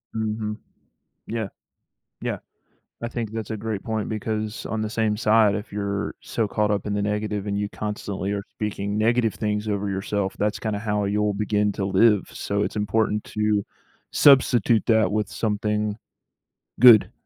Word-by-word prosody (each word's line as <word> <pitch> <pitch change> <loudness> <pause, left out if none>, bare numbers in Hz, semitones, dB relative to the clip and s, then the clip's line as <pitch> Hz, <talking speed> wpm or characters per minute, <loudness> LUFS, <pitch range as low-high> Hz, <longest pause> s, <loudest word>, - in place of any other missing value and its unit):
Mhm. 110 -1 -2 0.7
Yeah. 110 -3 -3 0.7
Yeah. - - -2 0.6
I 115 - -2
think 115 -3 -4
that's 110 0 -5
a 110 - -2
great 110 -2 -4
point 110 -2 -2
because 110 0 -3
on 110 -1 -2
the 110 - -3
same 110 -2 0
side, 110 -1 +4
if 105 0 -5
you're 100 0 -2
so 110 -3 -2
caught 105 0 0
up 100 0 -1
in 105 - -1
the 100 - 0
negative 105 0 -2
and 100 - -1
you 105 - -1
constantly 100 -2 -4
are 100 - -2
speaking 105 -1 -3
negative 115 0 +2
things 105 0 -2
over 100 -1 -1
yourself, 95 0 -2
that's 105 0 0
kinda 110 -2 -2
how 105 -1 0
you'll 105 0 +1
begin 105 0 +1
to 95 - -2
live, 105 +1 +4
so 100 0 -2
it's - - -2
important 105 0 +1
to 105 -1 0 0.5
substitute 120 -5 +5
that 110 -2 +3
with 105 0 0
something 105 -1 -1 0.9
good, 120 -4 +8
105 Hz, 165 wpm, -24 LUFS, 105-110 Hz, 0.9 s, good